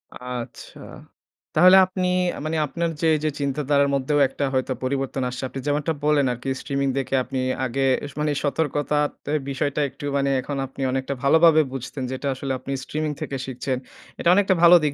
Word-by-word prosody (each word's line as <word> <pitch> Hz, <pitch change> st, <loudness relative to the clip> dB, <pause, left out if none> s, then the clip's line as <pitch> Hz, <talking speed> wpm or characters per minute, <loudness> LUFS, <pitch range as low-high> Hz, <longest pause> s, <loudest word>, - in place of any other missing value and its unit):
আচ্ছা। 125 Hz, -1 st, -7 dB, 0.8 s
তাহলে 185 Hz, +2 st, +8 dB
আপনি 185 Hz, -1 st, -2 dB, 0.3 s
আ -, -, -6 dB
মানে, 160 Hz, +1 st, -1 dB
আপনার 170 Hz, +3 st, -2 dB
যে 165 Hz, -, +2 dB
এই -, -, -1 dB
যে -, -, +3 dB
চিন্তাধারার 140 Hz, 0 st, +1 dB
মধ্যেও 140 Hz, +2 st, +1 dB
একটা 140 Hz, -, -3 dB
হয়তো 130 Hz, 0 st, 0 dB
পরিবর্তন 135 Hz, 0 st, -2 dB
আসছে। 125 Hz, +1 st, -6 dB
আপনি 135 Hz, -, -6 dB
যেমনটা 150 Hz, +2 st, 0 dB
বললেন 150 Hz, -2 st, +3 dB
আরকি 125 Hz, +3 st, -6 dB
স্ট্রিমিং 140 Hz, -1 st, -1 dB
দেখে 135 Hz, 0 st, -2 dB
আপনি 130 Hz, +1 st, -4 dB, 0.3 s
আগে 135 Hz, +2 st, -1 dB, 0.3 s
স -, -, -19 dB
মানে 150 Hz, 0 st, +1 dB
সতর্কতাতে 145 Hz, 0 st, -1 dB, 0.2 s
বিষয়টা 140 Hz, +2 st, -1 dB
একটু 140 Hz, +2 st, -10 dB
মানে 140 Hz, 0 st, +1 dB
এখন 140 Hz, +2 st, -5 dB
আপনি 135 Hz, +1 st, -10 dB
অনেকটা 135 Hz, +1 st, -2 dB
ভালোভাবে 160 Hz, +2 st, +6 dB
বুঝতেন 135 Hz, +1 st, -5 dB
যে -, -, -4 dB
এটা 140 Hz, -, -2 dB
আসলে 135 Hz, +1 st, -4 dB
আপনি 135 Hz, -, -7 dB
স্ট্রিমিং 155 Hz, +2 st, -2 dB
থেকে 135 Hz, -, -3 dB
শিখছেন। 130 Hz, 0 st, -3 dB, 0.4 s
এটা -, -, +2 dB
অনেকটা 200 Hz, -1 st, +3 dB
ভালো 175 Hz, +1 st, +9 dB
দিক 150 Hz, -, +1 dB
140 Hz, 180 wpm, -23 LUFS, 135-150 Hz, 0.8 s, ভালো